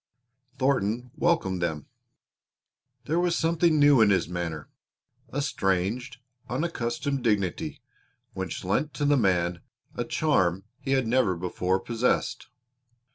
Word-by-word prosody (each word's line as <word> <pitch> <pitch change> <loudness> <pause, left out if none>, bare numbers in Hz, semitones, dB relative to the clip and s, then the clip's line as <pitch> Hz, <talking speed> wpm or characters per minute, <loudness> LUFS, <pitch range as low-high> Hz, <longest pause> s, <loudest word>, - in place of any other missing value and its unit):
Thornton 125 -2 0
welcomed 95 - +1
them. 80 -4 -2 1.2
There 165 +3 +1
was 175 -1 +1
something 165 -1 +2
new 145 -4 +6
in 110 - +6
his 95 -4 +2
manner 85 -3 -4 0.6
a 145 +1 -2
strange, 100 +1 -1 0.3
unaccustomed 135 -2 -2
dignity 100 -6 -1 0.5
which 95 -3 -4
lent 125 +11 0
to 145 - -1
the 145 0 +4
man 90 -7 +1 0.3
a - - -2
charm 90 +1 +1 0.2
he 135 - -1
had 130 -2 +2
never 115 -5 +2
before 90 +1 -1
possessed. 120 +3 -1
115 Hz, 120 wpm, -27 LUFS, 95-140 Hz, 1.2 s, new